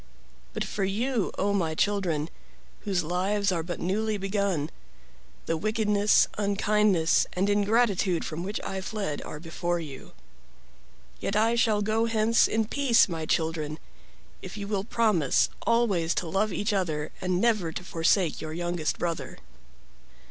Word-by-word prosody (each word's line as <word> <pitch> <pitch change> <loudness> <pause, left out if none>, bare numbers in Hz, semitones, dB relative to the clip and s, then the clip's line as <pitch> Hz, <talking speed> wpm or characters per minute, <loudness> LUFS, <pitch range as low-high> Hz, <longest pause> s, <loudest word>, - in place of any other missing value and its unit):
But - - -2
for 200 - -3
you, 225 +3 0
0 200 +1 +1
my 165 -5 0
children, 170 -6 0 0.5
whose 190 -4 0
lives 195 +5 0
are 170 -2 0
but 175 +2 -5
newly 210 +4 -1
begun, 195 -6 -1 0.7
the 165 - 0
wickedness, 210 +2 +3
unkindness, 200 -4 +2
and 190 +2 0
ingratitude 205 -3 +2
from 155 +1 -5
which 200 +4 -3
I 190 0 -4
fled 190 -7 -3
are 150 - -7
before 170 +1 -2
you. 145 -5 -9 1.1
Yet 200 - -2
I 225 +2 +3
shall 220 -3 +2
go 220 +2 +1
hence 225 0 +3
in 220 0 0
peace, 250 0 +3
my 165 -3 -4
children, 160 -2 -1 0.6
if - - -8
you 200 -1 -5
will 200 -1 -1
promise 215 - +2 0.2
always 205 -8 +2
to 175 - -2
love 195 +5 0
each 205 +3 -1
other 155 -6 -1
and 180 -1 0
never 215 -7 +2
to 180 - -6
forsake 170 0 +1
your 155 0 -5
youngest 175 -1 -2
brother." 170 -1 -3
195 Hz, 145 wpm, -27 LUFS, 170-215 Hz, 1.1 s, wickedness